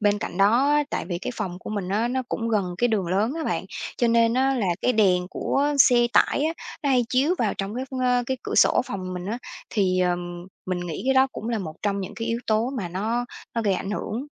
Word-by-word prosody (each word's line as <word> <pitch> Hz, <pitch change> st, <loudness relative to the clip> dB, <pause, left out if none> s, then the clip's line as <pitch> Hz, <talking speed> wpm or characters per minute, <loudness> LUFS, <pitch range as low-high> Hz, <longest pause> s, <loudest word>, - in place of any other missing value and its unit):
Bên 205 Hz, -1 st, +2 dB
cạnh 180 Hz, -, -5 dB
đó 235 Hz, +8 st, +4 dB
á, 295 Hz, 0 st, +4 dB
tại -, -, -2 dB
vì 175 Hz, -2 st, -3 dB
cái 190 Hz, -, -4 dB
phòng 180 Hz, -2 st, -4 dB
của 185 Hz, -, -8 dB
mình 200 Hz, -4 st, -3 dB
á, 215 Hz, +5 st, +1 dB
nó 260 Hz, +1 st, -1 dB
cũng 230 Hz, 0 st, -2 dB
gần 195 Hz, -5 st, 0 dB
cái 245 Hz, -, +3 dB
đường 205 Hz, -6 st, 0 dB
lớn 200 Hz, +7 st, +1 dB
á 325 Hz, -, -3 dB
bạn. -, -, -1 dB, 0.3 s
Cho 240 Hz, -, +2 dB
nên 230 Hz, 0 st, +4 dB
á, 270 Hz, +1 st, +2 dB
là 230 Hz, -7 st, 0 dB
cái 250 Hz, -, +2 dB
đèn 185 Hz, -4 st, +3 dB
của 275 Hz, -, 0 dB, 0.2 s
xe 240 Hz, -2 st, +6 dB
tải 285 Hz, -, +3 dB
á, 320 Hz, -, +1 dB, 0.3 s
nó 285 Hz, -, 0 dB
hay 250 Hz, -2 st, +3 dB
chiếu 275 Hz, +8 st, +2 dB
vào 220 Hz, -4 st, +1 dB
trong 195 Hz, +2 st, -4 dB
cái, 255 Hz, +2 st, -3 dB, 0.2 s
ơ, 250 Hz, -1 st, +2 dB
cái 260 Hz, -, -1 dB
cửa -, -, -4 dB
sổ -, -, +5 dB
phòng 185 Hz, -2 st, -5 dB
mình 180 Hz, +1 st, -5 dB
á. 230 Hz, +4 st, -3 dB, 0.3 s
Thì, 185 Hz, -4 st, +1 dB
ờm, 175 Hz, -1 st, -2 dB, 0.2 s
mình 185 Hz, -1 st, -2 dB
nghĩ 175 Hz, -3 st, -5 dB
cái 265 Hz, -, +3 dB
đó 265 Hz, 0 st, +6 dB
cũng 225 Hz, -, -6 dB
là 230 Hz, -, 0 dB
một 160 Hz, -6 st, -6 dB
trong 200 Hz, -1 st, 0 dB
những 195 Hz, +2 st, -6 dB
cái 225 Hz, +2 st, -4 dB
yếu 230 Hz, 0 st, 0 dB
tố 220 Hz, +3 st, +1 dB
mà 185 Hz, -7 st, -3 dB
nó 220 Hz, +7 st, -1 dB, 0.3 s
nó 230 Hz, -, 0 dB
gây 200 Hz, -3 st, +2 dB
ảnh 195 Hz, -, -4 dB
hưởng. 230 Hz, +5 st, -3 dB
215 Hz, 260 wpm, -24 LUFS, 185-245 Hz, 0.3 s, xe